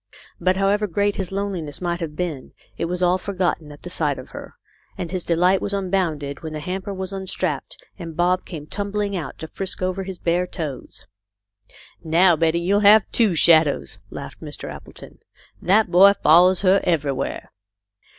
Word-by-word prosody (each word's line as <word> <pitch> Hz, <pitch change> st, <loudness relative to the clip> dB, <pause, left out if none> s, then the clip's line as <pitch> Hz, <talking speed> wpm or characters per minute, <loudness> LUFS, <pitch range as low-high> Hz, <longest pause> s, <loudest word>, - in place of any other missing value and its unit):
But 185 Hz, +2 st, +1 dB
however 200 Hz, +2 st, +2 dB
great 205 Hz, +3 st, 0 dB
his 190 Hz, -2 st, -3 dB
loneliness 190 Hz, -7 st, -3 dB
might 175 Hz, -1 st, -2 dB
have 160 Hz, -3 st, -5 dB
been, 155 Hz, -6 st, -4 dB, 0.2 s
it -, -, -2 dB
was 180 Hz, +1 st, -2 dB
all 180 Hz, +1 st, +3 dB
forgotten 180 Hz, -6 st, -2 dB
a*, 145 Hz, -, -11 dB
the 180 Hz, -, -10 dB
sight 150 Hz, -5 st, 0 dB
of 130 Hz, -, -10 dB
her, -, -, -10 dB, 0.4 s
and 170 Hz, -2 st, -5 dB
his 185 Hz, -2 st, -3 dB
delight 180 Hz, +3 st, +2 dB
was 200 Hz, -, -2 dB
unbounded 175 Hz, -8 st, -2 dB
when 160 Hz, -2 st, -6 dB
the 155 Hz, -, -4 dB
hamper 185 Hz, +5 st, -4 dB
was 190 Hz, 0 st, -5 dB
unstrapped 185 Hz, -6 st, -3 dB, 0.2 s
and 165 Hz, -3 st, -8 dB
Bob 180 Hz, +1 st, +2 dB
came 155 Hz, -5 st, -8 dB
tumbling 205 Hz, +3 st, -3 dB
out 170 Hz, -5 st, -5 dB
to 160 Hz, -, -7 dB
frisk 190 Hz, +2 st, -3 dB
over 185 Hz, +1 st, -1 dB
his 190 Hz, -1 st, -7 dB
bare 175 Hz, +2 st, 0 dB
toes. 155 Hz, -8 st, -7 dB, 0.5 s
" 100 Hz, +1 st, -23 dB, 0.2 s
Now 170 Hz, +2 st, +4 dB
Betty 165 Hz, +2 st, 0 dB
will 200 Hz, +1 st, +3 dB
have 210 Hz, 0 st, +7 dB
two 215 Hz, -7 st, +2 dB
shadows," 155 Hz, -, +3 dB
laughed -, -, -9 dB
Mr. -, -, -7 dB
Appleton. -, -, -12 dB, 0.2 s
" -, -, -31 dB
That 210 Hz, -2 st, +4 dB
boy 195 Hz, +3 st, +7 dB
follows 175 Hz, +3 st, +6 dB
her 195 Hz, 0 st, +4 dB
everywhere." 145 Hz, -6 st, -1 dB
180 Hz, 180 wpm, -22 LUFS, 160-195 Hz, 0.5 s, have